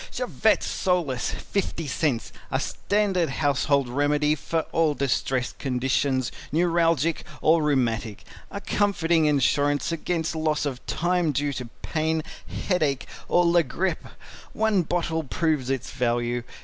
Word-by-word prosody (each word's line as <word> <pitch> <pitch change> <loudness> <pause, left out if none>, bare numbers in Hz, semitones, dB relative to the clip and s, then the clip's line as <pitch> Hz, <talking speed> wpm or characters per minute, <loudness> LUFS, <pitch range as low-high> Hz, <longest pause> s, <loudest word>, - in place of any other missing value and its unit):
CHAVETT - - +1
SOLACE 170 -10 0
50 180 -4 -3
Cents 140 -3 -1 0.2
A - - 0
standard 195 -5 0
household 140 -1 +1
remedy 145 +3 +2
for 160 +1 -1
all 160 -3 +2
distressed 130 -2 -1
conditions, 130 0 0 0.2
Neuralgic 165 -1 +2 0.2
or 160 +1 +4
Rheumatic. 120 -7 0 0.3
A 200 - -5
comforting 175 -7 +2
insurance 145 +1 +2
against 165 0 -2
loss 155 -1 0
of 130 -3 -4
time 175 -2 +1
due 145 +1 -1
to 125 -3 -6
pain, 160 0 0 0.4
headache 155 -8 +1 0.2
or 175 0 +3
la 170 0 +5
grippe. 180 +6 -2 0.5
One 220 -3 +2
bottle 165 -1 -1
proves 150 -2 -1
its 135 -3 -2
value. 120 0 0
155 Hz, 125 wpm, -25 LUFS, 135-170 Hz, 0.5 s, la